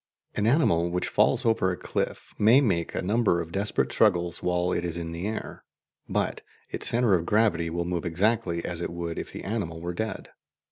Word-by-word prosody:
An 105 - 0
animal 85 - +3
which 90 +1 -1
falls - - +3
over 110 -5 +3
a 90 - -4
cliff - - -3
may 110 +5 +7
make 95 - 0
a - - -1
number 105 -2 +2
of 85 -1 -5
desperate 100 +3 0
struggles 85 -5 +2
while 90 0 0
it 85 - 0
is 85 -1 -3
in 85 -1 -4
the 85 +4 -4
air, 110 +1 -5 0.5
but - - -1 0.3
its - - -3
centre 115 -3 +3
of 85 -3 +3
gravity 105 -6 +2
will 85 +1 -2
move 85 -1 -2
exactly 90 -1 0
as 85 -1 -4
it - - -2
would 85 -1 -4
if - - -6
the - - -7
animal 95 -6 -3
were 85 +1 -4
dead. 110 +3 -4
90 Hz, 200 wpm, -27 LUFS, 85-110 Hz, 0.5 s, may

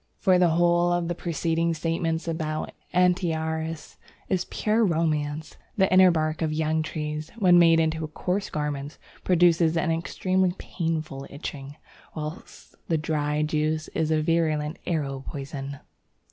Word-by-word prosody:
For 185 -3 +3
the 175 -1 +5
whole 175 +1 +3
of 175 -1 0
the - - 0
preceding 165 0 -1
statements 165 +1 -1
about 155 -2 -3 0.2
Antiaris 160 -3 0 0.3
is 185 -2 0
pure 220 +2 +1
romance. 155 -4 -1 0.2
The 190 -2 +3
inner 185 0 +8
bark 155 -2 0
of 160 -1 0
young 160 0 0
trees, 155 0 -4
when 180 -5 +6
made 165 -1 +6
into 160 0 0
coarse 180 +5 -2
garments, 150 -1 -4 0.3
produces 170 -2 +4
an 165 0 +1
extremely 185 +2 0
painful 155 -5 -4
itching, 140 -1 -7 0.4
whilst 155 +2 -8
the 165 - +1
dried 150 -1 -1
juice 155 0 -1
is 155 - -1
a 155 -1 +2
virulent 155 -1 0
arrow 140 -5 -1
poison. 140 -1 -6
160 Hz, 135 wpm, -26 LUFS, 155-175 Hz, 0.4 s, inner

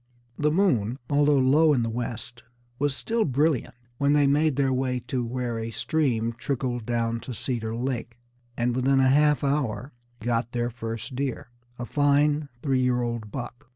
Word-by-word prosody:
The 150 0 +3
moon, 135 - +2
although 145 0 +4
low 145 +4 +5
in 125 -4 +2
the 115 - -1
west, 120 0 -5 0.4
was 145 -1 +1
still 230 +7 0
brilliant 135 - +1 0.2
when 140 +1 +3
they 145 -1 +4
made 145 +1 +3
their 135 -1 +2
way 130 -1 0
to 125 +1 -2
where 120 -1 -3
a 115 0 -4
stream 115 0 0
trickled 125 -4 -2
down 115 -1 0
to 125 +1 -7
Cedar 115 -2 -3
Lake, 120 -1 -3 0.4
and 120 0 0
within 135 +1 +3
a 130 0 +4
half 150 +2 +4
hour 140 -2 -1 0.3
got 120 0 -1
their 120 0 -1
first 115 +2 -6
deer, 135 -1 -3 0.3
a 120 - -4
fine 145 +2 +2
three 135 -3 +2
year 125 -1 +1
old 115 -3 -3
buck. 120 +1 -7
125 Hz, 170 wpm, -26 LUFS, 120-145 Hz, 0.4 s, low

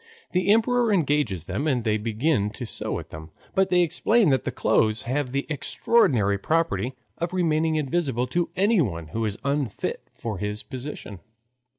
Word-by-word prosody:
The 185 +2 +1
emperor 230 +1 +3
engages 145 - +1
them 145 - -2
and 130 -5 +1
they 110 -1 +1
begin 110 +1 0
to 125 - -6
sew - - -3
at - - -9
them, 80 +1 -9 0.2
but 190 0 +2
they 180 -1 +4
explain 180 +4 +3
that 130 - +1
the - - -1
clothes 110 0 +1
have 130 +1 -1
the 140 +1 -1
extraordinary 130 - +2
property 160 -2 0 0.2
of 170 +1 -2
remaining 160 -3 +1
invisible 140 -4 0
to 170 +7 -1
anyone 150 - +1
who 115 +6 -2
is 105 0 -2
unfit 140 -5 -1 0.2
for 110 -5 -4
his 105 +2 -3
position. 125 -7 -7
140 Hz, 165 wpm, -25 LUFS, 110-170 Hz, 0.2 s, they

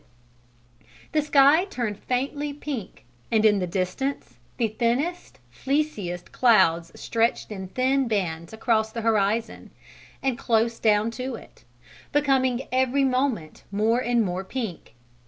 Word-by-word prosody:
Then - - -30 0.2
the 310 - +2
sky 290 +3 +5
turned 235 - -4
faintly 285 +3 -2
pink 280 - -7 0.3
and 220 -1 +3
in 205 -2 +5
the 180 - -1
distance 185 - -3 0.2
the 230 -2 +1
thinnest, 245 +11 -1
fleeciest 210 - -2
clouds 180 -9 +3
stretched 230 -1 0
in 190 -2 -6
thin 260 +5 +1
bands 170 -7 -2
across 220 -1 0
the 230 - -4
horizon 220 0 0 0.5
and 265 -2 0
close 230 -2 +1
down 215 0 +2
to 255 +1 -4
it, 115 - -15 0.5
becoming 265 -3 +1
every 260 +2 +2
moment 255 - -1
more 220 +4 +2
and 240 -2 +1
more 180 +1 -3
pink. 195 - -6
230 Hz, 130 wpm, -25 LUFS, 205-265 Hz, 0.5 s, sky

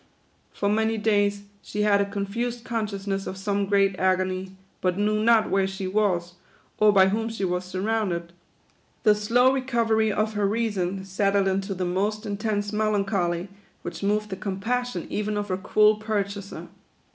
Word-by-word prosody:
For 200 - -2
many 220 +2 +1
days 205 -2 +1 0.2
she 210 - -3
had 200 -1 +4
a 200 - -1
confused 230 +5 -3
consciousness 200 -4 -3
of 190 - -5
some 200 0 -1
great 195 -1 +3
agony, 185 0 0 0.2
but 180 0 0
knew 215 +1 +1
not 230 -1 +4
where 195 -1 +2
she 190 0 -5
was, 185 -3 0 0.5
or 215 0 +6
by 190 -1 +5
whom 225 +3 -1
she 220 -4 -3
was 180 0 -1
surrounded. 185 -3 -2 0.7
The 215 -3 +6
slow 240 +5 +3
recovery 230 -4 +1
of 215 +1 0
her 205 -1 +1
reason 195 -4 -1
settled 195 0 +1
into 195 +1 -1
the 180 0 -2
most 205 +5 -1
intense 205 0 -2
melancholy, 195 -4 0 0.3
which - - -6
moved 210 +1 0
the 190 - -3
compassion 225 +6 -2
even 210 0 -1
of 205 0 -3
her 185 - 0
cruel 215 +2 +3
pur 215 -1 0
chaser. 200 0 -8
205 Hz, 160 wpm, -25 LUFS, 190-215 Hz, 0.7 s, or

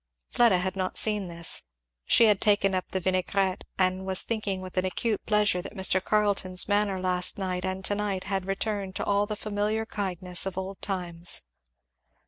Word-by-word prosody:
Fleda 235 -6 +5
had 185 +1 -2
not 185 -1 -2
seen 210 -3 +1
this. 170 -1 -2 0.4
She 230 - +6
had 210 -3 +3
taken 205 -2 +3
up 185 -1 -2
the 190 - -2
vinaigrette, 185 +1 0
and 185 0 +1
was 190 -1 +3
thinking 210 -4 -2
with 185 -1 -9
acute 190 +4 -1
pleasure 210 -4 +2
that 195 - -9
Mr. 190 -1 +1
Carleton's 200 -3 +1
manner 205 -2 +1
last 180 -1 +1
night 185 -2 -3
and 185 0 -3
to - - +2
night 200 -2 -2
had 195 -1 -3
returned 195 -1 -2
to - - -2
all 205 0 +2
the 215 - -3
familiar 210 +1 -1
kindness 185 -4 -1
of 190 - -5
old 190 +1 -5
times. 175 - 0
190 Hz, 175 wpm, -27 LUFS, 185-205 Hz, 0.4 s, She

